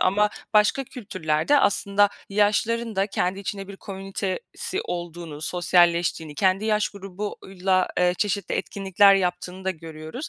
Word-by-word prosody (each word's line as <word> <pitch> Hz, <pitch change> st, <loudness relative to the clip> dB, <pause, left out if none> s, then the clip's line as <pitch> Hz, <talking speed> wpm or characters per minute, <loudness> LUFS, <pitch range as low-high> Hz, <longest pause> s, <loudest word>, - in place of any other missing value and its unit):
ama 210 Hz, +3 st, +3 dB, 0.2 s
başka 210 Hz, +6 st, +4 dB
kültürlerde 190 Hz, -, 0 dB
aslında 205 Hz, -3 st, +3 dB, 0.2 s
yaşlıların 215 Hz, +2 st, +1 dB
da 195 Hz, +1 st, +2 dB
kendi 190 Hz, -1 st, -1 dB
içinde 195 Hz, 0 st, -5 dB
bir 200 Hz, -, -8 dB
komünitesi 195 Hz, -, -4 dB
olduğunu, 170 Hz, -, -6 dB
sosyalleştiğini, 175 Hz, -2 st, +2 dB
kendi 190 Hz, +5 st, +2 dB
yaş 215 Hz, -1 st, +2 dB
grubuyla, 190 Hz, -1 st, -2 dB
eee, 180 Hz, 0 st, +3 dB
çeşitli 200 Hz, -3 st, -1 dB
etkinlikler 195 Hz, 0 st, +3 dB
yaptığını 180 Hz, 0 st, -2 dB
da 190 Hz, -, +1 dB
görüyoruz. 160 Hz, -, -7 dB
195 Hz, 125 wpm, -24 LUFS, 180-205 Hz, 0.2 s, başka